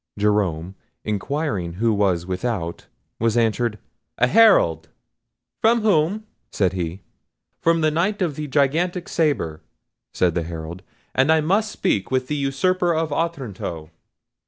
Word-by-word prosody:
Jerome, 95 -5 0 0.3
inquiring 105 - -2
who 110 +5 +1
was 95 -4 +1
without, 90 -2 -3 0.3
was 115 +1 +1
answered, 115 -1 +1 0.4
"A 120 - +4
Herald." 125 - +4 0.7
"From 230 +1 +4
whom?" 205 +1 +2 0.3
said 95 -2 +1
he. 90 +1 -4 0.6
"From 165 0 +3
the 155 0 +3
Knight 185 +7 0
of 170 -7 -1
the 150 0 -4
Gigantic 165 +6 +1
Sabre," 140 - 0 0.5
said 90 -2 +1
the 85 - 0
Herald; 80 +1 -7 0.3
"and 135 +4 +3
I 160 - +5
must 200 +7 +1
speak 100 - -1
with 130 -1 -1
the 150 - 0
usurper 170 +6 +1
of 160 -2 -1
Otranto." 115 - -4
125 Hz, 135 wpm, -22 LUFS, -, 0.7 s, I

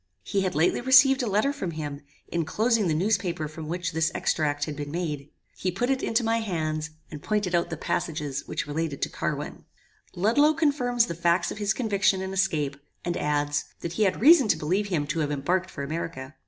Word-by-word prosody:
He 200 -2 0
had 185 -1 -1
lately 160 +8 +2
received 260 +1 +6
a 245 - -1
letter 215 +8 +2
from 195 -11 -4
him, 145 -2 -5 0.3
enclosing 215 +6 +1
the 155 - +1
newspaper 175 -3 0
from 155 +1 -8
which 175 +1 -2
this 160 -1 +1
extract 145 -2 0
had 150 - -5
been 145 0 -5
made. 150 -3 -3 0.3
He 185 - -2
put 240 +9 -1
it 265 - 0
into 225 +2 +1
my 225 0 +1
hands, 155 -7 -2 0.2
and 150 -2 -7
pointed 210 -2 -1
out 170 -1 +2
the 160 - -4
passages 150 -5 -3
which - - -3
related 150 -1 -3
to - - 0
Carwin. - - -4 0.5
"Ludloe 260 - +3
confirms 255 -7 +2
the 195 - -4
facts 170 +1 +1
of - - -6
his 205 -1 +1
conviction 200 -4 +1
and 190 0 -4
escape; 155 -7 0 0.3
and 175 0 -1
adds, 145 0 0 0.2
that 170 - -4
he 215 - +1
had 185 - 0
reason 290 -1 +7
to 165 - +3
believe 185 +7 0
him 165 -7 0
to 155 +3 -2
have 150 -2 0
embarked 175 +6 0
for 140 - -6
America. 140 -2 -5
175 Hz, 205 wpm, -26 LUFS, 155-215 Hz, 0.5 s, reason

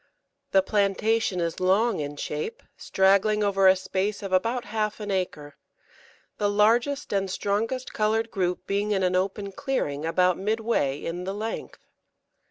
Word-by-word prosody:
The 190 -1 +4
plantation 205 0 +1
is 170 -1 -2
long 195 +4 +2
in 145 0 -4
shape, 150 +8 -4
straggling 200 +2 +2
over 195 -1 +3
a 190 - +7
space 195 +3 -2
of 195 -1 -4
about 230 +6 +1
half 210 0 -2
an 210 -1 -4
acre, 150 -6 -3 0.8
the 205 -1 +2
largest 235 +8 +2
and 195 -1 0
strongest 225 +7 -2
coloured 220 +1 0
group 180 -3 -1
being 200 +1 -1
in 190 -1 0
an 180 0 +1
open 195 +2 -1
clearing 190 - -2
about 180 +2 +2
midway 215 -9 0
in 175 +3 -5
the 195 +1 -3
length. 220 +2 -6
200 Hz, 150 wpm, -26 LUFS, 185-215 Hz, 0.8 s, a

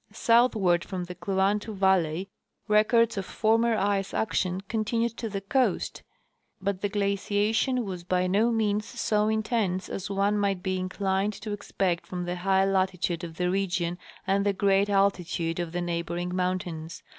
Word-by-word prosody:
Southward 220 -6 +3
from 185 -2 -4
the 180 +1 -7
Kluantu 200 +3 0
valley, 190 -2 +2 0.4
records 220 +1 +3
of 195 - -2
former 225 +1 +2
ice 195 -1 0
action 185 -4 0
continued 230 +3 -1
to 225 - -4
the 195 -1 -4
coast, 255 +6 0 0.6
but 195 0 -2
the 205 - 0
giaciation 205 +5 +1
was 185 -4 -6
by 180 +1 +1
no 205 +6 +3
means 215 -2 +1
so 210 0 0
intense 220 -4 0
as 195 +1 -5
one 200 +1 +1
might 195 -3 0
be 185 -1 -1
inclined 190 +2 -1
to 210 +1 -7
expect 195 -3 -2
from 180 -1 -4
the 175 +1 -3
high 190 +1 +2
latitude 185 -3 0
of 165 -2 -6
the 180 0 +1
region 180 -2 -1 0.3
and 195 +1 +2
the 200 0 +2
great 195 +1 +2
altitude 180 -4 +1
of 170 -2 -3
the 175 +1 -2
neighboring 175 +1 -3
mountains. 180 -2 -3
195 Hz, 155 wpm, -27 LUFS, 180-210 Hz, 0.6 s, Southward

